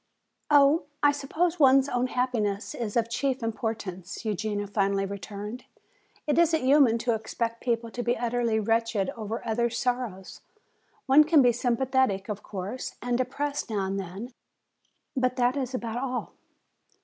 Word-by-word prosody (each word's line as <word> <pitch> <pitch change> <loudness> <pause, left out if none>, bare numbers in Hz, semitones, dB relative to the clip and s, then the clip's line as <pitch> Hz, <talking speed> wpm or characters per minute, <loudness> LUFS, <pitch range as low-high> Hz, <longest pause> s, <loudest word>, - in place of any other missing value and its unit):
"Oh, 290 +2 +5 0.2
I 290 - +7
suppose 320 +5 -1
one's 270 -1 +6
own 250 -1 0
happiness 230 -6 -1
is 230 -2 -3
of 230 -1 +2
chief 260 +1 -1
importance," 220 -5 -4
Eugenia 210 0 -2
finally 200 -1 0
returned. 200 +4 -7 0.6
"It 295 +2 +2
isn't 330 -3 +3
human 265 -4 +5
to 235 +1 0
expect 230 +1 -3
people 230 -2 -1
to 245 - -4
be 240 0 0
utterly 235 -2 0
wretched 225 -2 0
over 225 +1 -5
others' 235 +1 0
sorrows. 240 -7 -3 0.6
One 280 +3 +7
can 305 -2 +5
be 245 - +5
sympathetic, 245 -4 0
of 210 -1 -4
course, 200 +5 -6
and 245 0 -1
depressed 275 +3 -2
now 205 -3 -1
and 195 +1 -2
then, 195 +7 -7 0.8
but 255 -1 +1
that 245 +1 +2
is 260 -2 -2
about 235 -2 -3
all." 255 -2 -3
235 Hz, 150 wpm, -27 LUFS, 215-260 Hz, 0.8 s, I